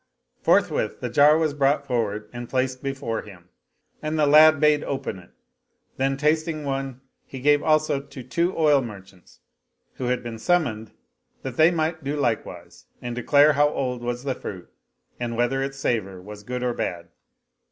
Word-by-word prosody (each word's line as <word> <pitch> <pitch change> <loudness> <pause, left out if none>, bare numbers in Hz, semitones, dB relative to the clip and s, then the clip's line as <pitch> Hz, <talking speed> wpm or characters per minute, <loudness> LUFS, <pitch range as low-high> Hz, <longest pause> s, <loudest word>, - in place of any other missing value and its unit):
Forthwith - - +1
the - - -4
jar 150 +2 +6
was 160 -2 0
brought 140 0 +1
forward 110 -5 -2
and 120 0 -7
placed 130 0 -1
before 135 -5 -3
him; 90 -4 -15 0.5
and 155 +1 -2
the 150 - +3
lad 155 +1 +7
bade 150 -1 +3
open 135 -8 -4
it; 90 - -17 0.7
then, 135 +1 0
tasting 155 +1 0
one 135 -2 -4 0.2
he 135 - -9
gave 145 +2 +3
also 155 -2 +2
to 140 -2 -11
two 170 +8 -1
oil 150 -4 +4
merchants 95 -6 -12 0.6
who 130 - -3
had 125 0 -1
been 115 -2 -7
sum 175 +8 +3
moned, 110 -5 -6 0.5
that 130 -2 -5
they 160 +3 +6
might 160 -2 -2
do 140 +2 -2
likewise 100 -10 -3
and 120 -1 -5
declare 145 +5 +4
how 145 +1 +3
old 125 -4 -3
was 120 +1 -4
the 135 -2 -1
fruit 95 -7 -9 0.5
and 120 -1 -3
whether 120 +3 +1
its 135 0 -4
savor 100 -8 -2
was 105 +3 -10
good 125 +4 -5
or 125 -1 0
bad. 85 -6 -4
135 Hz, 175 wpm, -24 LUFS, 115-150 Hz, 0.7 s, lad